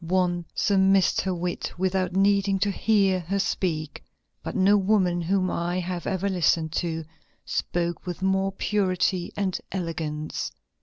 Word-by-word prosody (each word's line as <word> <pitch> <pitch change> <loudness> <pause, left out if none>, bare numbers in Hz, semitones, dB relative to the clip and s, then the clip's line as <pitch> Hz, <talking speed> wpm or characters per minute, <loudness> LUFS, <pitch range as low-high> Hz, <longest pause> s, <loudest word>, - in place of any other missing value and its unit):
One 175 0 0
surmised 195 -1 +3
her 190 -1 -1
wit 175 0 -3
without 185 0 0
needing 200 0 +3
to 200 0 +2
hear 195 -3 +2
her 180 +3 -2
speak, 160 -6 -2 0.4
but - - -6
no 200 0 +5
woman 190 -3 +2
whom 185 +2 +1
I 175 +1 -1
have 180 -1 -4
ever 190 +1 -1
listened 170 -4 +1
to, 165 -2 -2 0.4
spoke 170 0 -2
with 180 +1 -4
more 190 0 +2
purity 185 -2 0
and 195 -3 0 0.2
elegance. 160 -4 -3
185 Hz, 140 wpm, -25 LUFS, 175-195 Hz, 0.4 s, no